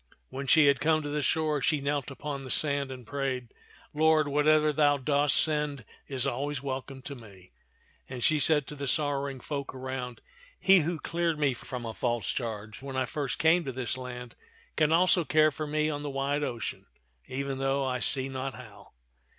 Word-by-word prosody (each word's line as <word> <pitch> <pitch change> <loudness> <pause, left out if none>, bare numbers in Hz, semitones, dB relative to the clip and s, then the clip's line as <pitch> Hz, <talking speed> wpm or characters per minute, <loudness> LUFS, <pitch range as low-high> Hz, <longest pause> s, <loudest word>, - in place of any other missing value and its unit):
When 140 +1 -6
she 155 +3 +6
had 140 -2 +4
come 155 +2 +2
to 145 - -4
the 150 0 -1
shore, 155 0 +1
she 150 0 +2
knelt 140 -1 -2
upon 140 0 -5
the 130 - -8
sand 140 0 +1
and 130 -2 -8
prayed, 130 -3 -3 0.4
Lord, 155 0 +4
whatever 150 +1 +3
thou 145 -1 +4
dost 145 +1 +2
send 150 -5 +2 0.2
is 135 -2 -1
always 140 +2 -2
welcome 135 0 -5
to 140 - -6
me," 100 -8 -14 0.6
and 125 -2 -5
she 155 -1 +3
said 150 0 +4
to 150 - -8
the 140 -1 -5
sorrowing 140 -2 -1
folk 140 +1 -5
around, 130 -2 -5 0.2
" - - -26
He 195 -1 +6
who 170 +1 -1
cleared 170 +1 -1
me 145 -3 +2
from 125 0 -7
a 115 - -4
false 120 -2 -1
charge 110 -3 -5
when 135 -1 -6
I 130 - +1
first 140 +1 -3
came 165 +2 +4
to 135 - -4
this 130 -1 -3
land 125 -2 -8 0.4
can 155 -1 +3
also 175 +1 +4
care 155 0 +4
for 155 +1 -5
me 155 +1 0
on 145 -2 -2
the 145 - -4
wide 140 +1 -1
ocean, 120 -6 -4 0.4
even 135 0 -3
though 135 0 +1
I 125 -1 -1
see 130 +1 +1
not 135 0 -4
how. 115 -5 -13
140 Hz, 195 wpm, -29 LUFS, 130-150 Hz, 0.6 s, she